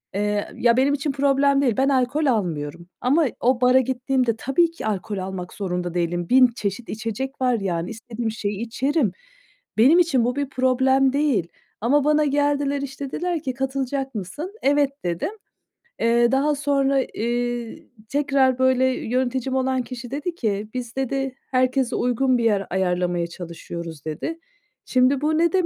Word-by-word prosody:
Eee, 205 0 0
ya, 235 0 +3
benim 275 +2 +3
için 290 +1 -1
problem 275 0 +3
değil, 245 -6 +1
ben 270 +1 +3
alkol 275 +3 +1
almıyorum 170 - -1
ama 290 +5 +3
o 250 0 +2
bara 250 +1 +6
gittiğimde 255 -1 0
tabii 325 +8 +2
ki 335 - -8
alkol 205 -1 -2
almak 185 -1 -5
zorunda 180 -3 -3
değilim, 175 0 -1
1.000 255 0 +7
çeşit 210 +2 -4
içecek 230 +5 -4
var, 250 -3 +2
yani, 175 -3 -2
istediğim 225 0 -4
şeyi 205 -2 -3
içerim. 255 +2 0 0.7
Benim 275 +11 +6
için 270 -9 +3
bu 245 +1 0
bir 285 -1 -2
problem 265 +1 +2
değil 275 - +1 0.3
ama 280 +5 +3
bana 300 +1 +3
geldiler, 285 0 +1
işte, 275 0 -6
dediler 345 -2 -2
ki: 260 - -2
"Katılacak 270 0 -3
mısın?" 295 - -6
"Evet." 285 0 +3 0.2
dedim. 175 - -1 0.7
Eee, 235 +1 +3
daha 290 +3 +2
sonra, 275 -1 +2
eee, 240 0 -3 0.2
tekrar 275 -3 +2
böyle 260 0 +3
yöneticim 260 +1 -1
olan 260 -1 +1
kişi 245 0 -8
dedi 300 +5 -3
ki: 210 - -2
"Biz," 245 -2 -5
dedi, 270 0 -2 0.2
"herkese 255 0 +1
uygun 250 +1 +2
bir 235 - -1
yer 205 -4 +1
ayarlamaya 180 -2 0
çalışıyoruz." 170 -2 -8
dedi. 315 - -4 0.5
Şimdi 255 +2 +3
bu 310 +1 +1
ne 335 -1 +2
dem 370 -2 +3
255 Hz, 155 wpm, -23 LUFS, 220-275 Hz, 0.7 s, 1.000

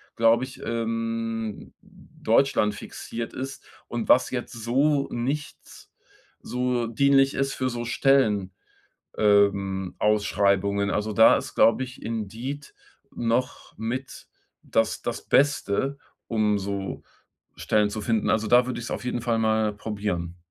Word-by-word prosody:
glaube 115 +2 +4
ich, 130 - -12
ähm, 115 -1 -3
deutschlandfixiert 115 -1 -1
ist 135 +1 -6 0.3
und 120 -1 -4
was 125 - +5
jetzt 125 -1 -4
so 140 +5 +1
nichts 140 +5 -5 0.5
so 125 -1 -1
dienlich 135 +3 +3
ist 135 0 0
für 130 0 -1
so 120 0 -4
Stellen 110 -8 +2 0.7
ähm, 100 -2 +2
Ausschreibungen. 100 -1 +1
Also, 105 +1 -1
da 110 +2 +7
ist, - - -7
glaube 125 +3 +4
ich, 125 0 -10
Indeed 115 +6 -5 0.4
noch 120 +2 -2
mit 120 +4 -5 0.3
das 115 -1 0
das - - -4
Beste, 140 -1 +1 0.3
um 105 -2 +1
so 100 0 -4 0.5
Stellen 105 -1 +1
zu 110 +1 -5
finden. 115 0 0
Also, 110 0 +1
da 120 +2 +5
würde 125 -1 -4
ich 120 - -6
es - - -6
auf - - -4
jeden 125 -1 -2
Fall 115 -1 0
mal 110 -1 +1
probieren. 100 -5 -4
115 Hz, 130 wpm, -25 LUFS, 105-125 Hz, 0.7 s, da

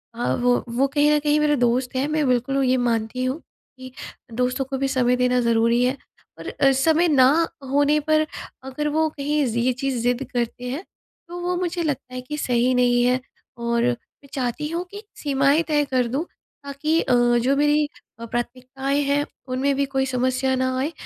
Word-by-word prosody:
हाँ, 240 - 0
वो, 245 0 +1
वो 260 +4 +1
कहीं 295 +1 +2
न 295 - +3
कहीं 295 0 +2
मेरे 300 -1 +3
दोस्त 245 +1 0
हैं 270 +3 0
मैं 305 -2 0
बिल्कुल 255 +2 +1
ये 255 0 +2
मानती 240 0 -1
हूँ 260 +5 -2 0.4
कि 260 0 -9 0.4
दोस्तों 250 +3 -1
को 270 +1 -4
भी 275 +1 0
समय 250 -2 +2
देना 250 0 +2
ज़रूरी 235 +1 +2
है। 255 +2 0 0.4
और - - -8
अ, 270 0 +3
समय 320 +6 +3
ना 290 +3 +4 0.2
होने 290 +2 +3
पर 310 0 +4 0.4
अगर 265 +3 -3
वो 315 +1 +1
कहीं 295 0 -1
ये 240 +2 0
चीज़ 265 0 -2
ज़िद 245 +2 +1
करते 245 +1 -2
हैं 295 +9 -4 0.4
तो 350 +1 -7
वो 360 +1 -1
मुझे 350 -1 -2
लगता 275 -4 -3
है 255 - -4
कि 300 +4 -6
सही 250 -2 +1
नहीं 245 -1 +3
है 250 +1 +2 0.4
और 235 0 0
मैं 245 +3 -4
चाहती 260 +3 -2
हूँ 340 +2 -2
कि 410 +1 -9
सीमाएंँ 280 +2 +2
तय 295 -1 +2
कर 255 -3 0
दूँ 275 +8 -2 0.4
ताकि 290 +4 -1
अ, - - 0 0.3
जो 275 +2 +2
मेरी 295 0 +3 0.3
अ, 230 - -6
प्राथमिकताएँ 255 +4 -3
हैं 285 +1 +1 0.2
उनमें 265 +2 0
भी 280 +1 +1
कोई 270 0 -1
समस्या 260 +1 0
न 260 - -1 0.2
आए। 275 +5 -1
265 Hz, 190 wpm, -23 LUFS, 250-295 Hz, 0.4 s, ना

